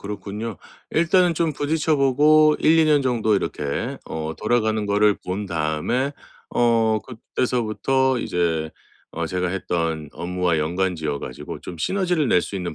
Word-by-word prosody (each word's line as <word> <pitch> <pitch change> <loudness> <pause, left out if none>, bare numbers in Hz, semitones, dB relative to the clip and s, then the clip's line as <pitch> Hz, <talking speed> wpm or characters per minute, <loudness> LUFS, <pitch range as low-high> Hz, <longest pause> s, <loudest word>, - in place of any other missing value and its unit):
그렇군요. 105 +2 -5 0.3
일단은 170 +1 +3
좀 165 -1 0
부딪혀 155 +2 0
보고 150 +3 +5
1-2 160 0 +4
년 150 -2 +4
정도 115 -4 +1
이렇게 75 -7 -2
어 80 0 -4
돌아가는 110 -3 +1
거를 105 0 +3
본 95 +3 -3
다음에 85 - -1 0.4
어 115 -2 +2
그때서부터 125 +3 -1
이제 80 -6 -1 0.4
어 85 0 -3
'제가 90 +2 -1
했던 85 -4 -2
업무와 90 -1 -1
연관 90 +4 0
지어 75 -3 -3
가지고 - - -7
좀 85 - -9
시너지를 180 - 0
낼 90 - +4
수 100 - -5
있는 90 -3 -4
105 Hz, 290 characters per minute, -22 LUFS, 85-135 Hz, 0.4 s, 보고